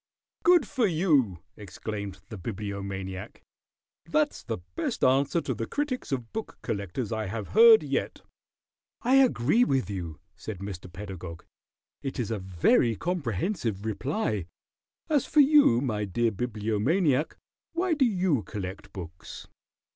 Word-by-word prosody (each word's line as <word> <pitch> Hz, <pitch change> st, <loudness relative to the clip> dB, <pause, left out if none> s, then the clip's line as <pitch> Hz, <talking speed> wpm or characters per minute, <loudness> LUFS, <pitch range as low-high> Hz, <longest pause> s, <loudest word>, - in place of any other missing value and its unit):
"Good 345 Hz, -8 st, +5 dB
for 245 Hz, -6 st, +1 dB
you!" 145 Hz, -, +2 dB
exclaimed 100 Hz, -1 st, -6 dB
the 110 Hz, -, -7 dB
Bibliomaniac. 100 Hz, -2 st, -5 dB, 0.6 s
"That's -, -, +1 dB
the -, -, -4 dB, 0.2 s
best -, -, -2 dB
answer 140 Hz, +5 st, +3 dB
to 130 Hz, -, -2 dB
the 115 Hz, -1 st, -4 dB
critics 285 Hz, -, -3 dB
of 125 Hz, -4 st, -3 dB
book 220 Hz, -, -5 dB
collectors 100 Hz, +3 st, -3 dB
I 110 Hz, -2 st, -2 dB
have 110 Hz, +3 st, -5 dB
heard 455 Hz, -1 st, +8 dB
yet." -, -, -2 dB, 0.8 s
"I 255 Hz, +3 st, +5 dB
agree 235 Hz, -, +4 dB
with 135 Hz, -, 0 dB
you," 85 Hz, -5 st, -5 dB, 0.2 s
said 110 Hz, -3 st, -7 dB
Mr. 95 Hz, -2 st, -7 dB
Pedagog. 90 Hz, -3 st, -8 dB, 0.6 s
"It 135 Hz, -1 st, -4 dB
is 115 Hz, -3 st, -2 dB
a 110 Hz, -, -1 dB
very 95 Hz, +5 st, +2 dB
comprehensive 120 Hz, -, -2 dB
reply. 110 Hz, -, -2 dB, 0.6 s
As 295 Hz, -4 st, +1 dB
for 305 Hz, -, +2 dB
you, 285 Hz, -, +6 dB
my 105 Hz, -6 st, -1 dB
dear 115 Hz, +4 st, +1 dB
Bibliomaniac, 125 Hz, -, 0 dB, 0.4 s
why 350 Hz, +1 st, +1 dB
do 290 Hz, -4 st, +3 dB
you 180 Hz, -, +1 dB
collect 95 Hz, -2 st, -7 dB
books?" 85 Hz, -3 st, -9 dB
115 Hz, 130 wpm, -28 LUFS, -, 0.8 s, heard